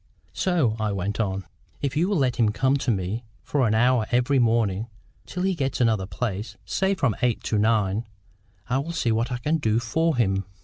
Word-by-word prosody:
"So," 160 Hz, -12 st, +1 dB
I 110 Hz, -1 st, 0 dB
went 100 Hz, +3 st, -3 dB
on, 95 Hz, -3 st, -1 dB, 0.4 s
"if 140 Hz, -1 st, -1 dB
you 170 Hz, +5 st, +2 dB
will 205 Hz, -, +1 dB
let 130 Hz, -4 st, +1 dB
him 115 Hz, -3 st, +3 dB
come 130 Hz, +5 st, +2 dB
to 135 Hz, -, -1 dB
me 100 Hz, +2 st, -1 dB, 0.2 s
for 135 Hz, -5 st, +1 dB
an 110 Hz, -, +2 dB
hour 120 Hz, -1 st, +3 dB
every 125 Hz, +3 st, +2 dB
morning, 115 Hz, -3 st, +1 dB, 0.4 s
till 180 Hz, -, -3 dB
he 190 Hz, 0 st, +2 dB
gets 135 Hz, -6 st, -2 dB
another 110 Hz, -6 st, +2 dB
place, 105 Hz, +2 st, -4 dB
say 195 Hz, +1 st, +1 dB
from 135 Hz, -, +1 dB
eight 125 Hz, -2 st, +1 dB
to 105 Hz, -, 0 dB
nine, 105 Hz, 0 st, +1 dB, 0.6 s
I 125 Hz, +2 st, +1 dB
will 165 Hz, +5 st, -4 dB
see 130 Hz, -8 st, 0 dB
what 115 Hz, +2 st, 0 dB
I 125 Hz, -, -1 dB
can 150 Hz, +7 st, 0 dB
do 110 Hz, -5 st, +1 dB
for 160 Hz, +7 st, 0 dB
him." 95 Hz, -4 st, +1 dB
120 Hz, 205 wpm, -25 LUFS, 105-135 Hz, 0.6 s, him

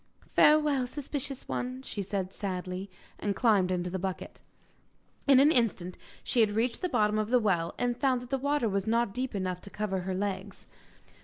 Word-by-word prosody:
'Farewell, 300 Hz, -4 st, +4 dB
suspicious 275 Hz, 0 st, -5 dB
one!' 255 Hz, +1 st, -3 dB
she 205 Hz, -, -5 dB
said 190 Hz, -1 st, -3 dB
sadly. 185 Hz, 0 st, -4 dB, 0.3 s
And 205 Hz, -1 st, -1 dB
climbed 205 Hz, -6 st, +3 dB
into 180 Hz, -1 st, -1 dB
the 190 Hz, -, -2 dB
bucket. 190 Hz, 0 st, -5 dB, 0.9 s
In 275 Hz, -2 st, +7 dB
an 290 Hz, +3 st, +6 dB
instant 205 Hz, -, +1 dB, 0.3 s
she 245 Hz, -, 0 dB
had 220 Hz, -2 st, +5 dB
reached 230 Hz, +2 st, 0 dB
the 365 Hz, -, -1 dB
bottom 210 Hz, -6 st, +2 dB
of 215 Hz, 0 st, -1 dB
the 250 Hz, -, +5 dB
well, 175 Hz, -7 st, 0 dB
and 245 Hz, -1 st, 0 dB
found 260 Hz, -1 st, +1 dB
that 250 Hz, -, -13 dB
the 270 Hz, -, +1 dB
water 285 Hz, -2 st, +1 dB
was 200 Hz, 0 st, -1 dB
not 230 Hz, -2 st, +1 dB
deep 255 Hz, -2 st, -3 dB
enough 185 Hz, -2 st, -2 dB
to -, -, -10 dB
cover 205 Hz, -2 st, -2 dB
her 185 Hz, +1 st, -3 dB
legs. 195 Hz, 0 st, -4 dB
215 Hz, 185 wpm, -29 LUFS, 190-255 Hz, 0.9 s, In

